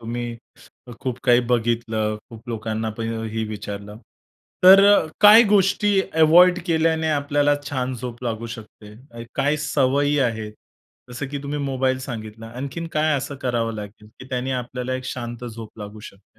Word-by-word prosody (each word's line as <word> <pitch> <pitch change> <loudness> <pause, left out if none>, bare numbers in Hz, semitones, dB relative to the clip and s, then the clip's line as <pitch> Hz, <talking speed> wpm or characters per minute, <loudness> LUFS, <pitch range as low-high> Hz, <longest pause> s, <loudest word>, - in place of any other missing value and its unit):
तुम्ही 120 +1 -5 0.6
खूप 130 -1 -3
काही 120 -1 +5
बघितलं, 115 -2 0
खूप 115 +1 -13
लोकांना 110 -1 -3
पण 115 0 -3 0.2
हे 110 0 -2
विचारलं, 105 0 -7 0.7
तर 195 +2 +9
अ, 160 - +3
काही 215 +3 +9
गोष्टी 200 0 +3
अव्हॉइड 175 +3 +6
केल्याने 160 -1 +1
आपल्याला 145 0 +2 0.2
छान 130 -2 -2
झोप 120 0 -7
लागू 115 0 -3
शकते, 115 +2 -13
काही 145 +2 +1
सवयी 145 0 +1
आहेत 110 -4 -1 0.6
जसं 125 +3 -5
की 145 - -4
तुम्ही 145 +1 -4
मोबाईल 130 -1 0
सांगितला, 110 -3 -7
आणखीन 140 +5 -5
काय 155 -1 +2
असं 140 +1 -4
करावं 115 -3 -1
लागेल, 105 0 -9
की 130 - -11
त्यांनी 130 0 -3
आपल्याला 125 0 -3
एक 130 0 -5
शांत 120 -1 -6
झोप 115 -2 -9
लागू 105 0 -9
शकते? 100 0 -25
125 Hz, 150 wpm, -22 LUFS, 115-145 Hz, 0.7 s, तर